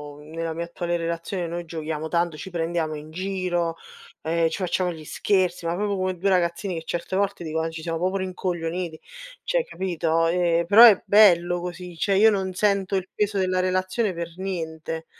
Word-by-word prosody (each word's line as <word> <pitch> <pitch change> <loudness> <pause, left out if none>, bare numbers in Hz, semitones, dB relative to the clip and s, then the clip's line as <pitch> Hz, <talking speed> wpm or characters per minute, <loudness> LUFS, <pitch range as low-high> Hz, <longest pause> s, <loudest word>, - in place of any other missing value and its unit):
uhm, 150 +1 -14
nella 165 0 -3
mia 170 +1 -3
attuale 175 0 -2
relazione 170 +2 -3
noi 170 +1 -5
giochiamo 160 -1 -4
tanto, 170 -1 0
ci 190 - -8
prendiamo 165 -2 -2
in 150 +1 -9
giro, 180 -2 -2 0.5
ehm, 165 0 +1
ci - - -4
facciamo 180 +1 0
gli 160 -2 -10
scherzi, 180 -1 0
ma 170 - 0
proprio 205 +1 -1
come 185 -1 -1
2 195 +3 -1
ragazzini 180 +1 +1
che - - -11
certe 175 +3 -4
volte 200 -2 0
dico: 160 0 -2
"Eh, 165 - -1
ci 160 -1 -8
siamo 165 -1 -2
proprio 185 +2 0
rincoglioniti", 175 -3 -3 0.4
cioè - - +1
capito. 165 - 0
Ehm, 170 -1 +2
però 215 +6 +9
è 210 -5 +8
bello 175 -4 +5
così, 180 0 -7
cioè 195 +4 +1
io 220 +2 +6
non 190 -2 -2
sento 200 -1 +1
il 190 -1 -1
peso 210 -1 0
della 185 -1 +1
relazione 185 +2 0
per 170 0 -5
niente. 165 -4 -4
175 Hz, 190 wpm, -24 LUFS, 165-190 Hz, 0.5 s, però